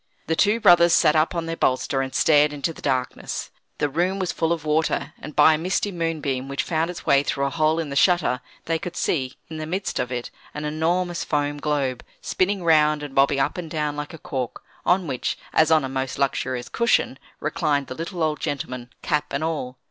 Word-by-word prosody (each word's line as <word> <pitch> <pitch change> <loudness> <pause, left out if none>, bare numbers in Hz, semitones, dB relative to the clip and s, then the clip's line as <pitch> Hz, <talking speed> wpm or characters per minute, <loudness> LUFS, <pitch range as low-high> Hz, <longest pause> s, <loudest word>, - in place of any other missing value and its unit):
The 160 - 0
two 210 +6 +3
brothers 175 -4 +6
sat 150 - +4
up 155 +3 +2
on 170 -1 -1
their 165 0 -3
bolster, 135 -1 +1
and 130 0 -4
stared 150 -1 +4
into 145 +3 -2
the - - -13
darkness. 130 -1 -2 0.3
The 145 - +1
room 175 +7 0
was 185 -3 -1
full 165 0 -1
of 165 -3 -2
water, 155 +1 0
and 150 - -9
by 155 +1 +7
a 155 - -1
misty 185 +4 0
moonbeam, 155 -7 -2
which 140 0 -2
found 165 0 0
its 180 - -7
way 140 - +5
through 140 0 -1
a 140 - -1
hole 155 -1 +2
in 160 -4 -3
the - - -4
shutter, 160 -6 +3 0.2
they 165 0 0
could 175 +1 -6
see, 130 -7 -1
in 160 - -7
the 155 0 -5
midst 190 +4 -2
of 125 - -2
it, 120 -1 -4 0.2
an 150 0 -4
enormous 165 +3 0
foam 145 -1 -1
globe, 140 -4 -1 0.2
spinning 190 0 0
round, 150 -2 +4
and 145 -2 -7
bobbing 140 +1 +3
up 135 - 0
and 165 -3 -6
down 150 -2 -2
like 150 0 -5
a 165 - -9
cork, 130 -5 -5 0.2
on 185 0 +3
which, 130 -5 -2 0.2
as 160 0 +4
on 160 -3 +4
a - - -2
most 130 0 -3
luxurious 130 -2 -1
cushion, 235 - +1 0.2
reclined 150 -2 0
the - - -6
little 170 +4 -4
old 155 -2 0
gentleman, 125 -3 -4
cap 150 0 0
and 140 +2 -2
all. 150 -6 -3
150 Hz, 215 wpm, -23 LUFS, 140-165 Hz, 0.3 s, by